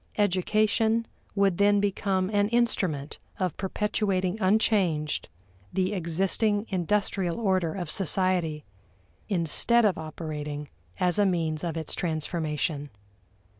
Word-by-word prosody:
Education 215 +3 +2 0.3
would 195 -3 +2
then 205 0 +4
become 195 -1 0
an 205 0 +2
instrument 185 -11 0 0.2
of 185 -6 -1
perpetuating 195 -1 -1
unchanged 185 -6 +1 0.4
the 190 +2 0
existing 195 +4 +2
industrial 190 -1 0
order 185 -7 0
of 175 -5 -4
society, 180 -5 +1 0.6
instead 205 +6 +3
of 195 -6 +1
operating 150 -2 -5 0.3
as 180 0 +2
a 205 - +4
means 160 -3 -1
of 165 -2 -3
its 160 -2 -3
transformation. 155 -3 -2
185 Hz, 105 wpm, -27 LUFS, 160-205 Hz, 0.6 s, then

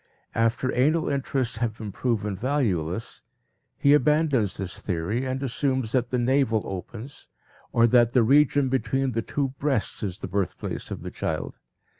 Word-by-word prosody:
After 115 +3 +1
anal 155 +6 +2
interests 135 -4 -1
have 115 -2 -2
been 105 -2 -6
proven 105 -3 -1
valueless, 105 - -1 0.6
he 140 - +4
abandons 150 - +2
this 95 -2 -5
theory 100 +8 -2
and 130 +1 -2
assumes 130 -2 -1
that 125 -1 +1
the 125 - 0
navel 120 -3 +2
opens 110 +8 -7 0.4
or 115 - +4
that 120 0 +4
the 125 - +5
region 140 +2 +4
between 135 0 0
the 115 -1 -1
two 140 +4 -2
breasts 135 -6 0
is 95 -3 -3
the - - -6
birthplace 95 -1 -3
of - - -6
the - - -6
child. - - -4
125 Hz, 155 wpm, -25 LUFS, 110-135 Hz, 0.6 s, the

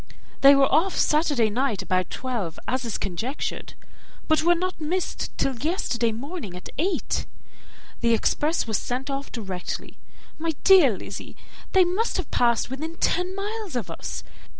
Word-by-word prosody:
They 275 +1 +9
were 275 0 +6
off 350 +7 +2
Saturday 290 -8 +3
night 240 -2 0
about 185 -2 0
twelve, 235 -11 -3
as 255 0 0
is 230 - -2
conjectured, 220 - -4 0.5
but 315 -1 +4
were 345 +2 +4
not 365 0 -3
missed 350 +4 -2
till 270 - 0
yesterday 245 -6 0
morning 250 - -6
at 180 - -8
eight. 370 +5 0 0.7
The 230 -1 +3
express 300 +8 +1
was 220 -4 0
sent 255 +3 -3
off 275 +1 -4
directly. 190 -6 -5 0.4
My 325 -1 -1
dear 330 - +7
Lizzy, 195 - -8 0.4
they 380 - +7
must 370 +6 0
have 370 - -4
passed 235 0 +2
within 315 +5 -4
ten 360 +2 +1
miles 415 -3 -4
of 240 - -2
us. - - -5
275 Hz, 150 wpm, -25 LUFS, 230-345 Hz, 0.7 s, They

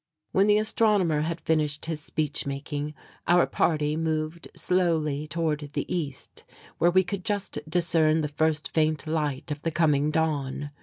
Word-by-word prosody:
When 195 +2 +3
the 210 0 +5
astronomer 210 -7 +2
had 165 +2 -2
finished 155 -3 0
his 160 -2 -3
speech 150 -1 -2
making, 145 +2 -4 0.3
our 175 0 +5
party 150 -2 +1
moved 160 +1 -2
slowly 160 -5 0
toward 150 -2 -2
the - - -2
East, 145 -6 -5 0.4
where 170 - +5
we 185 +2 +4
could 185 +1 -4
just 205 -7 -2
discern 165 -2 +3
the 150 - -1
first 150 0 0
faint 155 -1 +1
light 150 -3 -2
of 145 0 -4
the 165 - -1
coming 150 -3 +2
dawn. 145 -3 -1
155 Hz, 155 wpm, -26 LUFS, 150-170 Hz, 0.4 s, the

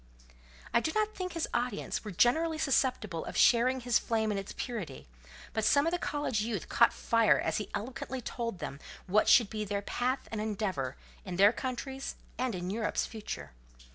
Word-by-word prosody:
I - - +6
do 315 - -1
not 430 0 +1
think 365 -3 -4
his 330 -1 -1
audience 245 +1 -1
were 215 - -6
generally 310 - +3
susceptible 255 - +1
of - - -6
sharing 255 +2 +5
his 245 -2 +3
flame 220 -2 0
in 200 - -1
its 195 - -7
purity; 210 - -5 0.5
but 220 - 0
some 285 +6 +4
of 330 - +2
the 350 - 0
college 290 -10 -1
youth 215 -4 -3
caught - - +5
fire 230 -2 +3
as - - 0
he 210 - -4
eloquently 250 +4 -4
told 230 -3 -4
them 150 -4 -6 0.3
what 205 +4 +3
should 230 -6 +6
be 215 -1 -2
their 200 0 -2
path 255 +5 -1
and 220 -2 -2
endeavour 195 - -2 0.3
in 185 -2 -5
their 200 +4 +6
country's 265 +2 -4 0.2
and 250 -4 0
in 180 +1 -3
Europe's 215 0 0
future. 220 - -7
230 Hz, 185 wpm, -31 LUFS, 205-260 Hz, 0.5 s, I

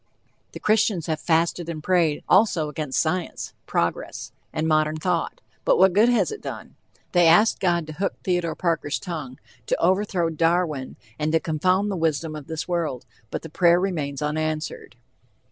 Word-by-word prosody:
The - - -7
Christians 210 -5 +2
have 160 -2 -2
"fasted 170 +1 0
and 155 -2 -5
prayed" 170 -5 +2
also 185 -6 +3
against 145 -3 -2
science, 165 +4 -2
progress, - - -2 0.2
and 160 0 -1
modern 155 0 +2
thought, 170 +1 -2 0.2
but - - +3
what 190 0 +5
good 215 +5 +5
has 245 - +2
it 430 - -7
done? - - -7 0.4
They 175 -2 +5
asked 190 +7 +5
God 175 -3 +1
to 155 - -8
hook 195 +6 -2
Theodore 175 -3 0
Parker's 165 -5 -1
tongue; 155 -8 -6 0.3
to - - 0
overthrow 185 -2 +1
Darwin, 165 -4 0 0.2
and 155 +1 0
to 160 - +4
confound 185 +6 +1
the - - -2
wisdom 160 -1 -1
of 150 -2 -8
this 160 -1 -4
world, 160 -8 -2 0.2
but - - -5
the 160 - -8
prayer 170 +2 +4
remains 150 -7 -2
unanswered. 155 -3 -3
165 Hz, 165 wpm, -24 LUFS, 155-180 Hz, 0.4 s, what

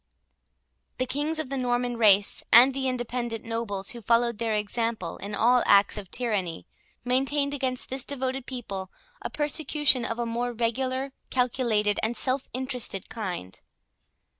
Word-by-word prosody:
The 255 - 0
kings 295 +5 -1
of 310 -4 -3
the 275 - -1
Norman 245 -1 0
race, 205 -3 +4
and 250 +3 +8
the 265 0 -1
independent 240 -2 -3
nobles, 225 -4 -3
who 235 - -8
followed 235 0 +2
their 225 -2 0
example 210 -3 -2
in 205 +1 -5
all 245 +3 +4
acts 200 0 +5
of 200 -3 -6
tyranny, 205 -9 -1 0.4
maintained 275 +3 +1
against 260 -3 -2
this 265 -1 +2
devoted 265 -1 -3
people 200 -7 -5 0.3
a - - -4
persecution 295 -3 +1
of 230 - -2
a 240 - -1
more 240 +1 -2
regular, 260 +3 -1 0.2
calculated, 235 -5 +1
and 230 +2 -1
self 260 0 -1
interested 250 -7 -3
kind. 180 - -5
240 Hz, 145 wpm, -27 LUFS, 220-260 Hz, 0.4 s, and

